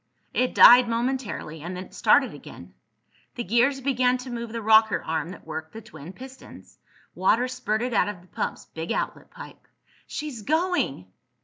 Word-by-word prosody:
It 255 0 0
died 245 0 +8
momentarily, 230 - -3
and 175 +3 -6
then 185 - -5
it - - -17
started - - +3
again. - - -12 0.6
The 240 - -3
gears 240 +7 +2
began 255 -1 +1
to 250 0 -9
move 235 -1 -5
the 230 - -4
rocker 220 0 +4
arm 160 0 -3
that 185 - -11
worked 160 0 -7
the 225 - -8
twin 160 -6 -11
pistons. 265 +5 -13 0.3
Water 225 +7 +2
spurted 245 -1 -2
out 205 - +2
of 195 -4 -8
the 180 - -21
pump's - - -4
big 160 +1 -6
outlet - - -3
pipe! - - -13 0.4
"She's 295 -7 -6
going!" 315 - 0
230 Hz, 170 wpm, -25 LUFS, 185-255 Hz, 0.6 s, died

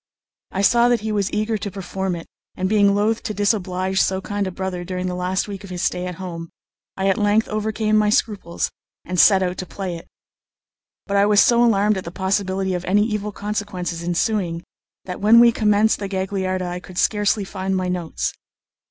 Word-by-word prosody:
I 195 - -2
saw 240 +3 +5
that 240 -2 +2
he 220 0 -3
was 200 -2 0
eager 215 +1 -1
to 200 - -4
perform 190 -1 -4
it, 165 - -8 0.3
and 185 - -1
being 200 -1 +4
loath 215 +2 +1
to 215 - -4
disoblige 190 -2 0
so 190 0 +1
kind 205 0 -3
a - - -3
brother 185 -1 -4
during 180 +1 -4
the 180 - -2
last 180 +2 -1
week 200 -1 -7
of 195 - -10
his 180 0 -4
stay 180 0 -1
at 180 - -5
home, 170 -2 -7 0.5
I 190 0 0
at 195 - +2
length 210 +1 +2
overcame 215 0 0
my 210 -1 +3
scruples 205 -5 -1 0.3
and 180 0 -2
set 195 -2 +6
out 180 0 -2
to 185 - -3
play 190 -3 -5
it. 165 - -13 1.0
But 200 -1 0
I 200 +1 +4
was 210 -1 +4
so 235 +2 +5
alarmed 210 -3 +3
at 190 - -4
the - - -6
possibility 190 +1 -1
of 180 -1 -3
any 205 +3 +3
evil 210 -2 -2
consequences 200 -5 -4
ensuing, 175 0 -1 0.4
that 180 -1 -6
when 220 +3 +7
we 235 0 +7
commenced 215 -1 +2
the 200 - -3
Gagliarda 190 -1 -2
I 175 0 -4
could 180 0 -13
scarcely 205 0 +2
find 190 0 -3
my 185 0 -1
notes. 180 -2 -2
195 Hz, 205 wpm, -21 LUFS, 185-210 Hz, 1.0 s, when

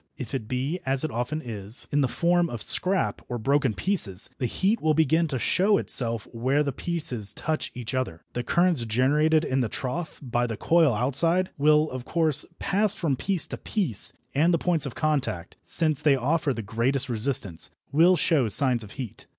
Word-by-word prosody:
If 130 -2 -7
it 130 -5 -3
be, 130 +8 -2
as 135 +1 0
it 155 - -2
often 125 +7 -3
is, 110 -2 -3
in 145 - +2
the 135 - +2
form 175 +3 +1
of 120 -5 -3
scrap, 185 +1 +2
or 120 - -3
broken 135 0 +1
pieces, 115 - -2
the 125 - 0
heat 200 - 0
will 155 -1 +2
begin 160 +2 +2
to 140 -4 -3
show 195 - +2
itself 115 -3 -1
where 130 +5 +1
the 140 - -2
pieces 125 - -3
touch 155 -1 -2
each 125 0 -5
other. 130 -11 -3
The 120 - -2
currents 170 +1 +2
generated 150 +7 +2
in 130 0 0
the 115 - -1
trough, 155 +9 -4
by 120 -1 -1
the 115 -2 -5
coil 160 -7 +3
outside, 165 - +1
will, 150 +2 +3
of 130 -1 -5
course, 155 -1 +1
pass 205 +1 +1
from 150 -6 -1
piece 185 +5 -1
to - - -5
piece 175 - -1 0.2
and 160 +5 +3
the 170 - +3
points 165 -4 0
of 130 - -8
contact, 140 - -2
since 155 -4 +1
they 145 -3 +4
offer 145 +4 0
the 115 -3 -4
greatest 120 +7 -1
resistance, 115 -7 0 0.2
will 170 +5 +5
show 150 -6 +2
signs 120 +2 +2
of 105 - -11
heat. 125 -7 -8
140 Hz, 190 wpm, -25 LUFS, 120-160 Hz, 0.2 s, will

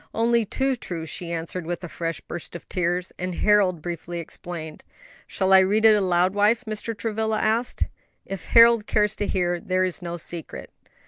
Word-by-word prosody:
"Only 230 0 +2
too 265 +5 0
true," 170 -8 -6
she 170 +2 -5
answered, 170 +1 -4
with 175 +1 -4
a - - -4
fresh 165 -2 -4
burst 175 0 -8
of 170 - -9
tears; 180 0 -1
and 180 -1 -3
Harold 195 -6 +3
briefly 170 0 -5
explained. 165 -1 -7 0.5
"Shall 190 0 +1
I 190 - +9
read 205 +4 +2
it 220 - +8
aloud, 185 -2 +2
wife?" 210 +4 +2
Mr. 215 +1 -4
Travilla 220 0 -1
asked. 230 +3 0 0.4
"If 195 -3 -6
Harold 230 -2 +6
cares 210 0 +1
to 205 - -1
hear. 175 -2 0
There 185 +1 0
is 185 0 -1
no 175 -1 -5
secret." 170 -1 -6
185 Hz, 180 wpm, -24 LUFS, 175-215 Hz, 0.5 s, I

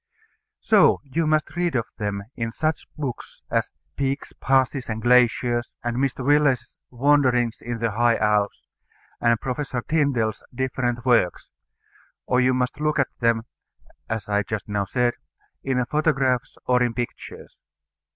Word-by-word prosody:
So 215 -3 +5
you 155 +3 -1
must 155 +2 +1
read 175 -3 0
of 115 -3 +1
them 100 -1 -2
in 115 -1 -3
such 155 +6 -2
books 140 -5 -6
as - - +1 0.3
Peaks, 140 0 -2
Passes, 135 -1 +1
and 110 0 -2
Glaciers, 120 0 +3
and 120 0 -2
Mr. 130 -1 -1
Willes's 140 -4 +2
Wanderings 125 -3 +2
in 120 0 -4
the 115 0 -1
High 120 +2 +3
Alps, 105 -1 0 0.6
and 115 -1 +3
Professor 130 -1 -3
Tyndall's 130 -9 +1
different 125 -2 -2
works; 120 -8 +2 0.7
or 125 0 +2
you 130 0 +3
must 125 +2 -1
look 150 0 +1
at 140 - +2
them 115 -1 +2 0.7
(as 110 -3 -3
I 105 0 +1
just 105 +1 -5
now 105 -1 -1
said) 120 +4 +1 0.5
in 125 -2 0
photographs 135 -4 0
or 125 0 +3
in 120 -2 +1
pictures. 120 -1 -7
125 Hz, 140 wpm, -24 LUFS, 115-135 Hz, 0.7 s, So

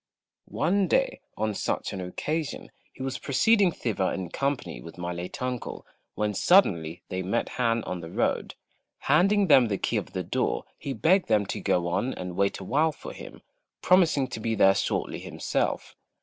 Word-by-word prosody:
One 185 +6 +1
day, - - +1 0.2
on 110 0 0
such - - -2
an 95 - -4
occasion, 150 - -4 0.2
he 130 - -8
was 135 0 -3
proceeding 195 - +3
thither 105 - -1
in 95 -3 -4
company 135 - -2
with 80 +6 -11
my 90 0 -3
late 85 +1 -6
uncle, 125 -1 -4 0.3
when 105 0 -1
suddenly 90 - +3
they 95 0 -2
met 100 +6 -1
Han 115 -2 0
on 90 -1 -4
the 80 - -8
road. - - -1 0.5
Handing 195 +8 +4
them 135 -8 +6
the 100 -2 -1
key - - -1
of - - -4
the - - -2
door, - - -1 0.2
he 140 - -4
begged 185 +6 +3
them 105 -2 +3
to - - -4
go 85 -1 +1
on 95 +9 -1
and 90 -1 -6
wait 100 +1 +1
awhile 150 +11 +1
for - - -9
him, - - -11 0.4
promising 165 -7 +4
to 120 - -5
be 115 0 -1
there 95 -2 +6
shortly 95 - -1
himself. - - -2
115 Hz, 175 wpm, -27 LUFS, 95-155 Hz, 0.5 s, them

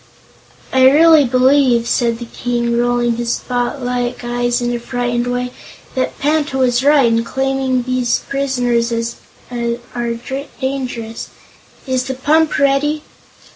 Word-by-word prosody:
"I 260 0 +6
really 315 +1 +6
believe," 255 -1 +3
said 235 -1 +1
the 240 - -7
King, 235 0 -2
rolling 240 -1 +1
his 235 0 -1
spotlike 245 0 -2
eyes 240 0 0
in 240 0 -1
a 240 - -2
frightened 245 0 -2
way, 245 0 -2 0.4
"that 260 - -2
Panta 295 -1 0
was 250 -1 +2
right 285 -2 +5
in 230 0 +2
claiming 265 0 -1
these 255 -1 0
prisoners 245 -4 0 0.6
are 240 +2 -4
dangerous. 250 -4 -4 0.6
Is 260 -2 -1
the 265 0 -3
pump 310 +4 +2
ready?" 285 +2 +1
250 Hz, 125 wpm, -17 LUFS, 240-270 Hz, 0.6 s, I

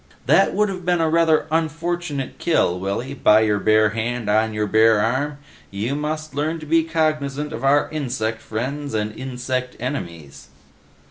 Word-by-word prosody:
"That - - +4
would 210 0 +3
have 185 -2 -6
been 175 0 +1
a 165 - +2
rather 165 -2 +3
unfortunate 165 -2 -2
kill, 90 - +1
Willy, 100 +8 -3
by 110 -5 +4
your 105 -2 +1
bare 110 +1 +4
hand 115 0 -2
on 110 +1 +2
your 105 0 -1
bare 110 +1 +4
arm. 130 +7 0 0.3
You 105 +7 -3
must 155 +1 -4
learn 155 +4 -2
to 155 - -9
be 165 +2 +3
cognizant 150 -3 -1
of - - -6
our 140 +2 +3
insect 120 -7 -3
friends 135 +4 -4
and 105 0 -2
insect 130 0 -4
enemies." 85 - -6
130 Hz, 160 wpm, -21 LUFS, 110-155 Hz, 0.3 s, That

